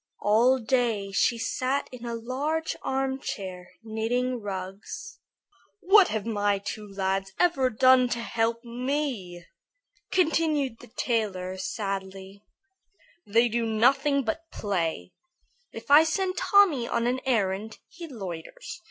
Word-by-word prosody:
All 235 +5 +4
day 230 -5 0
she 230 +4 +2
sat 255 +4 -1
in 245 -1 -8
a 235 - -3
large 285 +8 -2
armchair 265 -9 -4
knitting 235 +3 -1
rugs. 200 - -7 0.6
"What 395 -1 +6
have 215 -2 -3
my 205 -3 +1
two 210 +1 -6
lads 195 -1 -2
ever 285 -8 +3
done 255 +1 +5
to 235 - -2
help 230 0 -1
me?" 240 - -3 0.7
continued 310 -8 +1
the - - -13
tailor, 195 -6 -1
sadly. 195 0 -5 0.8
"They 230 +4 +4
do 235 0 -1
nothing 270 +6 +2
but 325 +9 -4
play. 165 - -2 0.6
If - - -8
I 295 +2 +9
send 370 +3 -1
Tommy 365 - +4
on 235 0 0
an 250 +2 0
errand, 215 -3 -1
he 340 -2 -10
loiters. 200 - -8
235 Hz, 120 wpm, -27 LUFS, 200-270 Hz, 0.8 s, I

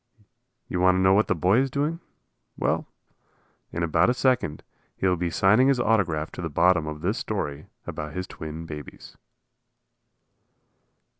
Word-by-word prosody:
You 90 - -3
want 90 0 +4
to - - +1
know 95 0 +5
what 105 +2 +3
the - - +1
boy 95 +6 +3
is 135 +1 +1
doing? 150 +5 -1 0.6
Well, - - 0 0.8
in 85 - -2
about 85 +2 +3
a 125 - +1
second 125 - 0 0.3
he - - -3
will 90 -1 +3
be 90 0 -2
signing 105 +9 +4
his 135 -2 +3
autograph 90 -10 +1
to - - -7
the 80 - -3
bottom 85 +1 +3
of 75 -1 -6
this 100 +8 -1
story 75 -9 -4 0.2
about 75 0 -6
his 90 +1 -3
twin 80 0 -8
babies. 75 -4 -10
90 Hz, 160 wpm, -25 LUFS, 80-110 Hz, 0.8 s, know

